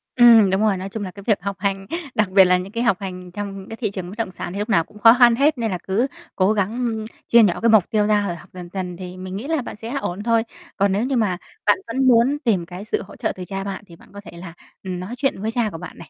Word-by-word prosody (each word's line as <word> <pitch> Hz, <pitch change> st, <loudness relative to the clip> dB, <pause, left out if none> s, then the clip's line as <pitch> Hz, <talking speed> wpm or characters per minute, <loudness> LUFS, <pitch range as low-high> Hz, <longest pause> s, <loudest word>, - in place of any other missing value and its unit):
Ừm, 230 Hz, -4 st, +7 dB
đúng 190 Hz, +2 st, +1 dB
rồi, 210 Hz, -3 st, +2 dB
nói 190 Hz, +1 st, -5 dB
chung 210 Hz, +1 st, -5 dB
là 185 Hz, -, -5 dB
cái 200 Hz, +2 st, -12 dB
việc 210 Hz, -5 st, +2 dB
học 200 Hz, +1 st, -3 dB
hành, 195 Hz, 0 st, -2 dB, 0.3 s
đặc 215 Hz, -3 st, +2 dB
biệt 190 Hz, 0 st, +6 dB
là 180 Hz, 0 st, +4 dB
những 185 Hz, +2 st, -6 dB
cái 230 Hz, +2 st, -2 dB
học 235 Hz, -6 st, +2 dB
hành 185 Hz, -2 st, -7 dB
trong 195 Hz, 0 st, -6 dB
cái 225 Hz, -, -7 dB
thị 215 Hz, -4 st, -2 dB
trường 185 Hz, -3 st, -6 dB
bất 195 Hz, -, -9 dB
động 225 Hz, -5 st, -2 dB
sản 180 Hz, -, -6 dB
thì 200 Hz, -, -4 dB
lúc 210 Hz, +3 st, -3 dB
nào 165 Hz, -7 st, +3 dB
cũng 210 Hz, -, -17 dB
khó 225 Hz, +1 st, +8 dB
khăn 240 Hz, -2 st, +7 dB
hết 280 Hz, +3 st, +2 dB
nên 225 Hz, -3 st, -1 dB
là 180 Hz, -, -1 dB
cứ 210 Hz, +7 st, +1 dB, 0.3 s
cố 190 Hz, +3 st, +3 dB
gắng, 200 Hz, -1 st, 0 dB, 0.2 s
ưm, 220 Hz, -1 st, -3 dB, 0.2 s
chia 235 Hz, -1 st, +6 dB
nhỏ 185 Hz, -5 st, +2 dB
cái 230 Hz, -, +3 dB
mục 215 Hz, -5 st, +5 dB
tiêu 210 Hz, -1 st, +1 dB
ra 210 Hz, -1 st, +2 dB
rồi 175 Hz, -, -3 dB
học 175 Hz, +2 st, -14 dB
dần 180 Hz, -1 st, -9 dB
dần 180 Hz, -2 st, -4 dB
thì 180 Hz, 0 st, -8 dB
mình 185 Hz, 0 st, -7 dB
nghĩ 220 Hz, +8 st, -5 dB
là 320 Hz, -2 st, 0 dB
bạn -, -, -7 dB
sẽ 225 Hz, +3 st, -8 dB
ổn 185 Hz, +4 st, -4 dB
thôi. 230 Hz, 0 st, +2 dB, 0.3 s
Còn 200 Hz, 0 st, +2 dB
nếu 200 Hz, +4 st, 0 dB
như 265 Hz, +2 st, -1 dB
mà 210 Hz, -7 st, +1 dB, 0.3 s
bạn -, -, +4 dB
vẫn 260 Hz, +3 st, 0 dB
muốn 250 Hz, +3 st, +4 dB
tìm 195 Hz, -8 st, +1 dB
cái 180 Hz, +4 st, -9 dB
sự -, -, -1 dB
hỗ -, -, -13 dB
trợ 235 Hz, -3 st, -2 dB
từ 185 Hz, -, -7 dB
cha 195 Hz, +2 st, -4 dB
bạn 195 Hz, +1 st, -5 dB
thì 170 Hz, -, -14 dB
bạn -, -, -20 dB
có 200 Hz, -, -9 dB
thể -, -, -11 dB
là, 170 Hz, -1 st, -9 dB, 0.3 s
ừm, 185 Hz, -2 st, -4 dB
nói 185 Hz, +6 st, -6 dB
chuyện 270 Hz, -7 st, -1 dB
với 220 Hz, +2 st, -1 dB
cha 230 Hz, -2 st, 0 dB
của 165 Hz, -, -8 dB
bạn 180 Hz, -, -10 dB
này, -, -, -12 dB
200 Hz, 310 wpm, -21 LUFS, 185-225 Hz, 0.3 s, khó